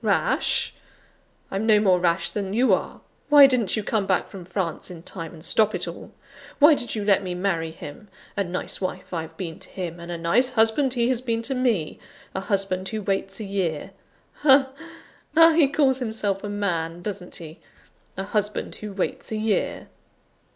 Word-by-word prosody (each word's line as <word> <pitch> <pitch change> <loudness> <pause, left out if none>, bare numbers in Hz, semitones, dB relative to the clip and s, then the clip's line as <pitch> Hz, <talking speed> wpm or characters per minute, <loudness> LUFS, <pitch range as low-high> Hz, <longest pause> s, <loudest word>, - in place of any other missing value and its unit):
Rash? - - +1 0.8
I'm 200 +3 -1
no 215 -2 +6
more 190 -3 +4
rash 175 0 +1
than 200 -2 -3
you 250 +3 +4
are! - - -2 0.3
Why 290 -2 +9
didn't 250 -7 +2
you 215 - -1
come 205 -2 -1
back 185 - +1
from 195 -3 -9
France 175 -1 -3
in 170 -2 -10
time, 165 -2 -7
and 165 0 -10
stop 215 -2 +2
it 180 - -3
all? 170 - -8 0.5
Why 300 +2 +7
did 240 -5 -1
you 210 -2 -3
let 200 -1 +4
me 180 -2 -4
marry 175 -3 -1
him? 160 +4 -10 0.3
A 200 - +1
nice 180 +1 -3
wife 185 0 -4
I've 160 -1 -5
been 165 -4 -6
to - - -10
him, 175 -2 -6
and 170 0 -7
a 170 - -3
nice 170 +10 +2
husband 245 +3 +2
he 235 -1 +2
has 250 -2 +1
been 230 -2 -1
to 270 - 0
me 235 -11 0 0.3
a - - -2
husband 190 -2 0
who 215 -1 -4
waits 195 0 -2
a - - -4
year! 190 -6 -2 0.5
Ha! 270 -2 +5 0.6
ha! 330 +1 +8
he 315 -3 +4
calls 270 -2 +2
himself 220 -5 -2
a 205 - -4
man, 175 -4 -2
doesn't 195 -3 -6
he? 160 -1 -9 0.6
A 195 - -2
husband 210 +1 -2
who 210 -2 -7
waits 190 +2 -3
a 220 - -1
year!" 215 -1 -1
200 Hz, 190 wpm, -24 LUFS, 180-225 Hz, 0.8 s, Why